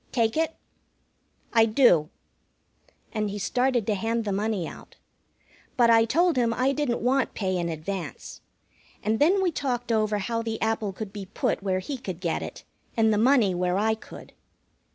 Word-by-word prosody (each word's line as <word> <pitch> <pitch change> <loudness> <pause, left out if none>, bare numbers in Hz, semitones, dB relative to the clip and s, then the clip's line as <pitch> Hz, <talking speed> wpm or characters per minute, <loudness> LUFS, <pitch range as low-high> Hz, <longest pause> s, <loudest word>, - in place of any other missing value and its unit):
Take 225 -2 +1
it?" 320 0 0 1.0
"I 225 -1 +6
do." 215 - +4 1.0
And 215 -2 -1
he 200 - -5
started 245 +2 +1
to 215 - +1
hand 225 +3 -1
the 205 - -1
money 200 -3 -1
out. - - -12 0.8
But 235 -2 +5
I 225 0 +6
told 335 +6 +2
him 230 -2 +2
I 255 +3 +2
didn't 275 -5 -1
want 260 +2 +1
pay 190 -3 -1
in 170 -1 -1
advance. 170 +3 -6 0.6
And 220 +1 0
then 380 +6 +4
we 360 - +2
talked 245 -5 -2
over 215 -1 +1
how 230 +3 -2
the 225 -1 -4
apple 220 -2 -1
could 195 +1 -7
be 200 -3 -7
put - - -1
where 190 -1 0
he 260 +8 -5
could 185 -7 -6
get 170 -3 -1
it, - - -8 0.3
and 220 -1 +4
the 210 - +1
money 235 -5 +4
where 180 +1 0
I 220 +2 +2
could. 220 - -11
220 Hz, 175 wpm, -26 LUFS, 200-245 Hz, 1.0 s, I